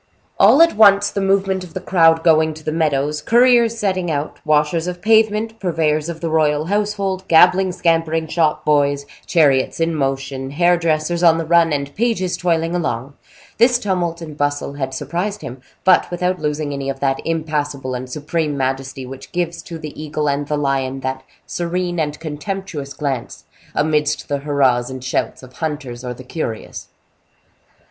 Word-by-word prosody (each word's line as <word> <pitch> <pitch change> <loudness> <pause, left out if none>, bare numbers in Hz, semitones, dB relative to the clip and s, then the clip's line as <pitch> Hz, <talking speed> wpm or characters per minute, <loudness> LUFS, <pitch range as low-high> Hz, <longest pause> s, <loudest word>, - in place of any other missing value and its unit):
All 320 - +7
at 335 - +2
once 205 -2 +5
the 200 - -2
movement 195 -1 +1
of 175 -3 -13
the - - -2
crowd 165 -3 +3
going 160 -1 +3
to 155 - -12
the 155 - -2
meadows, 150 -2 0
couriers 235 0 +4
setting 185 -5 -1
out, 150 -1 -3
washers 155 +2 +1
of 180 0 -4
pavement, 220 +2 +2
purveyors 160 -3 0
of 165 -1 -6
the 165 - -2
royal 155 -1 +2
household, 200 -1 -1
gabbling, 180 +3 +5
scampering 165 -2 0
shop 160 -1 0
boys, 145 -1 +2 0.2
chariots 145 -6 +2
in 165 0 +1
motion, 135 -2 -2
hair 175 +5 +3
dressers 170 0 0
on 165 -2 +5
the 165 - -2
run, 170 0 +4
and 140 -1 -2
pages 210 -4 0
toiling 165 -1 0
along, 140 -6 -2 0.5
this 240 +1 +5
tumult 175 -6 -2
and 155 -2 -9
bustle 145 -1 -1
had 135 -2 -4
surprised 170 +9 -4
him, 130 -2 -8 0.2
but 185 -1 +4
without 180 +1 -1
losing 150 -1 -2
any 140 -1 -4
of 135 -1 -4
that 135 -1 0
impassible 150 -5 -2
and 125 +1 -5
supreme 150 +1 -2
majesty 135 0 -3
which 130 +1 -10
gives 175 -1 -2
to 165 - -8
the 155 -2 -8
eagle 150 -1 -2
and 140 0 -1
the 150 - -1
lion 135 -2 -1
that 130 0 -3 0.2
serene 175 0 -2
and 150 -1 -2
contemptuous 155 -2 -5
glance 135 -5 -4 0.3
amidst 150 -1 0
the 145 - -1
hurrahs 135 -4 +1
and 130 -1 -7
shouts 130 +1 -2
of 130 0 -13
hunters 145 -6 -4
or 125 - -4
the 130 - -11
curious. 125 -5 -5
155 Hz, 170 wpm, -19 LUFS, 140-175 Hz, 0.5 s, All